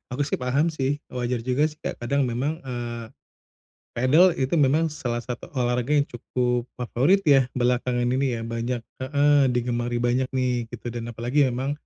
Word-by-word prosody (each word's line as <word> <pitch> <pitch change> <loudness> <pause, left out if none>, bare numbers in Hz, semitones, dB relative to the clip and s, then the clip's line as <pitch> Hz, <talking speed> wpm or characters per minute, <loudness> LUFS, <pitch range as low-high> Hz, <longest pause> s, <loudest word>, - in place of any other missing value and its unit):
Aku 145 - 0
sih 140 - -2
paham 140 +6 +1
sih, 140 -2 -1 0.2
wajar 125 -1 -2
juga 130 +5 +2
sih, 150 - -11 0.2
kadang 140 +4 0
memang, 135 +6 -2
eee, 120 -2 -5 0.9
padel 155 +9 +5
itu 130 +2 -1
memang 150 +4 +3
salah 120 -5 -3
satu 125 0 -6
olahraga 125 +2 0
yang 145 - +4
cukup 125 0 -1
favorit 130 +10 +2
ya, 135 -4 +5
belakangan 125 0 +1
ini 130 -2 0
ya, 115 - -5
banyak 115 +1 -2 0.2
heeh, 145 +2 +3
digemari 120 -1 -1
banyak 125 +2 +1
nih, 125 -3 0
gitu, 120 0 -7
dan 120 -1 -5
apalagi 125 +5 +1
memang 130 +3 -2
125 Hz, 160 wpm, -24 LUFS, 120-140 Hz, 0.9 s, padel